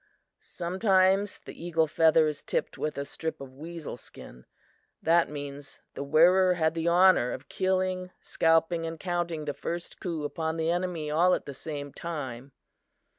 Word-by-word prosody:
Sometimes 190 +2 +1
the - - -10
eagle 165 -2 +2
feather 160 0 +4
is 150 -1 -2
tipped - - -2
with 155 - -3
a 140 - -2
strip 160 +3 -5
of 135 -1 -10
weasel 160 -1 -7
skin; 60 - -13 0.5
that 165 +1 +3
means 145 -1 -8
the - - -6
wearer 180 +5 +5
had 160 -2 +1
the 165 0 -2
honor 175 -7 +5
of 140 - -7
killing, 185 -1 0
scalping 165 +1 +2
and 165 0 -6
counting 175 -3 -2
the 145 - -2
first 170 +3 -6
coup 165 -4 -3
upon 160 +2 -2
the 160 +1 +1
enemy 175 -4 -2
all 175 +4 +4
at - - -6
the 140 - -6
same 145 0 -6
time. 140 -6 -6
165 Hz, 160 wpm, -28 LUFS, 150-175 Hz, 0.5 s, wearer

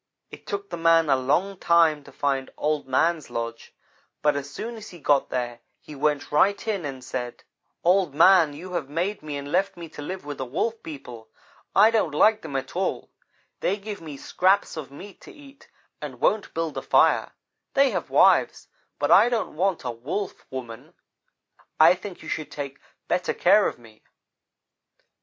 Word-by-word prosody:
"It - - -13
took 200 -1 -5
the 170 - -4
man 165 -2 +4
a - - +6
long 175 +9 0
time 165 -3 +3
to 140 - -13
find 135 -1 -1
Old 150 -2 -1
man's 160 +5 +1
lodge, 115 0 -5 0.5
but 150 -1 +3
as 140 0 -4
soon 230 +10 -6
as 220 -1 -10
he 175 - -12
got 145 -3 +2
there 120 -2 -3 0.2
he 150 - -12
went 145 0 -1
right 200 +9 +2
in 200 -7 -1
and 135 -3 -6
said: 125 -1 -5 0.4
"'Old 180 -4 +2
man, 170 -1 +6
you 180 +5 -9
have 160 -6 -3
made 180 +7 -2
me 150 -2 -5
and 140 +1 -7
left 190 +1 0
me 170 -1 -8
to 150 - -10
live 185 +3 -6
with 145 -1 -6
the - - -1
Wolf 225 - -2
people. 120 -7 -10 0.5
I 220 - +7
don't 195 -10 0
like 220 +6 +4
them 140 - -7
at 135 +3 -4
all. 190 +2 -2 0.5
They 200 - 0
give 205 -1 -7
me 150 -4 -8
scraps 190 +7 +1
of 155 -5 -6
meat 190 +9 -12
to - - -13
eat 285 -5 -17 0.3
and - - -7
won't 210 -1 +1
build 165 -2 -2
a - - -8
fire. - - +3 0.4
They 275 -1 +4
have - - -3
wives, - - +3 0.3
but - - 0
I 240 - +7
don't 230 -9 -2
want 185 +2 0
a 125 - -2
Wolf 140 - -5
woman. 120 -4 -8 0.8
I 160 +3 +8
think 185 -1 -9
you - - -10
should 155 -1 -4
take 140 -2 -7 0.3
better 180 +1 0
care 205 +3 +5
of - - -5
me.' 115 -2 -18
160 Hz, 185 wpm, -25 LUFS, 140-195 Hz, 0.8 s, I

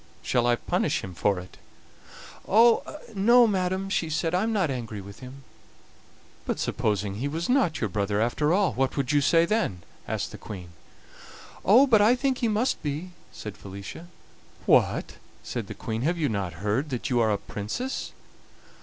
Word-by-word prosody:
Shall 120 -1 +1
I 120 - +4
punish - - -1
him 95 - -7
for 100 +3 +1
it?" 90 0 -10 0.9
"Ah! 230 +3 +6 0.4
no, 235 +5 +6
madam," 190 -2 0
she 170 -4 -1
said; 160 +2 -1
"I 180 - +2
am 225 +2 0
not 190 -9 +1
angry 115 -5 -5
with 100 +1 -11
him. 130 +1 -11 1.0
"But - - -2
supposing 105 -4 -1
he 130 +6 -2
was 160 +4 -3
not 250 - +2
your 110 - 0
brother, 100 +1 -1
after 130 +7 +1
all, 190 0 +2
what 135 +2 -1
would 140 -1 0
you 145 -1 +3
say 165 +4 +4
then?" 170 - -1 0.2
asked - - -3
the - - -10
Queen. 90 -4 -8 0.9
"Oh! 235 +8 +7
but 225 -6 +5
I 225 +4 +5
think 260 0 0
he 235 - +1
must 220 +4 0
be," 150 +5 -4 0.2
said 105 -2 -8
Felicia. 100 - -9 0.6
"What!" - - +2 0.3
said - - -4
the - - -7
Queen, 110 0 -4
"have 170 +6 0
you 155 -3 0
not 95 -3 -4
heard 125 +9 0
that 125 -1 -3
you 120 - +3
are 110 -2 +3
a 105 - +1
Princess?" 105 - -4
140 Hz, 180 wpm, -26 LUFS, -, 1.0 s, Oh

